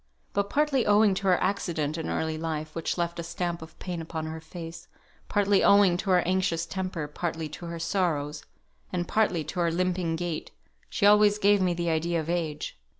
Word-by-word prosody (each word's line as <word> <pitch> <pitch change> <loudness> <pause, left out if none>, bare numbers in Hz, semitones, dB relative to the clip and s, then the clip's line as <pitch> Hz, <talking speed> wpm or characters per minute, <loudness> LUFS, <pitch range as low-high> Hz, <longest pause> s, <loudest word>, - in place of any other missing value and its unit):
But 200 0 0
partly 285 -2 +2
owing 205 0 +5
to 195 +1 -2
her 180 -1 +4
accident 170 -6 -1
in 160 - -4
early 160 0 -1
life, 155 -1 -4
which 165 +1 -2
left 170 0 -2
a - - -3
stamp 170 0 -3
of 160 0 -11
pain 175 -3 -5
upon 160 -1 -5
her 160 0 -6
face, 165 0 -9 0.4
partly 205 -1 +3
owing 200 -3 +6
to 195 +2 -4
her 180 -1 +5
anxious 175 -2 0
temper, 185 -5 -4
partly 160 +1 -3
to 170 +3 -8
her 170 0 -5
sorrows, 160 -4 -1 0.5
and 175 -2 -2
partly 195 -7 +1
to 165 +5 -5
her 170 -1 +3
limping 175 -1 0
gait, 170 -1 -4 0.4
she - - 0
always 210 0 +6
gave 205 -1 +4
me 180 -2 +2
the 170 -1 -1
idea 165 +1 0
of 160 +1 -3
age. 155 - -3
175 Hz, 195 wpm, -27 LUFS, 160-190 Hz, 0.5 s, owing